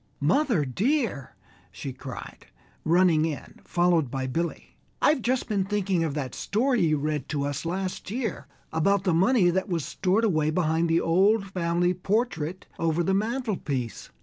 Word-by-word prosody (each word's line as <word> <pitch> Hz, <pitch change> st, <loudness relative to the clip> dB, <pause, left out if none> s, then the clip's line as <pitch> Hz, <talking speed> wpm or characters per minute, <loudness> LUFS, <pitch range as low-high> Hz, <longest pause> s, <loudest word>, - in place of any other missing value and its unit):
"Mother, 190 Hz, -, +2 dB
dear!" 215 Hz, -, -1 dB, 0.4 s
she 95 Hz, +9 st, -6 dB
cried, 130 Hz, 0 st, -9 dB, 0.4 s
running 170 Hz, -1 st, +4 dB
in, 160 Hz, -3 st, -5 dB
followed 175 Hz, -5 st, +2 dB
by 135 Hz, +1 st, -3 dB
Billy, 165 Hz, +6 st, -3 dB, 0.2 s
"I've 295 Hz, -3 st, +3 dB
just 250 Hz, +2 st, 0 dB
been 205 Hz, -4 st, +1 dB
thinking 195 Hz, -3 st, 0 dB
of 155 Hz, -3 st, -2 dB
that 135 Hz, -4 st, -3 dB
story 245 Hz, +4 st, +1 dB
you 155 Hz, -3 st, +3 dB
read 150 Hz, -1 st, -2 dB
to 145 Hz, -2 st, -1 dB
us 145 Hz, +2 st, -3 dB
last 185 Hz, +2 st, -3 dB
year 220 Hz, -, -3 dB, 0.3 s
about 190 Hz, +5 st, +2 dB
the 185 Hz, -4 st, +2 dB
money 185 Hz, +1 st, +4 dB
that 190 Hz, +3 st, -1 dB
was 165 Hz, -5 st, -1 dB
stored 190 Hz, +4 st, 0 dB
away 155 Hz, -8 st, +2 dB
behind 160 Hz, 0 st, +1 dB
the 165 Hz, +1 st, +3 dB
old 195 Hz, +5 st, +3 dB
family 175 Hz, -1 st, 0 dB
portrait 185 Hz, -3 st, -1 dB
over 165 Hz, +1 st, +1 dB
the 190 Hz, -, +1 dB
mantelpiece. 200 Hz, -, -2 dB
175 Hz, 155 wpm, -26 LUFS, 155-200 Hz, 0.4 s, running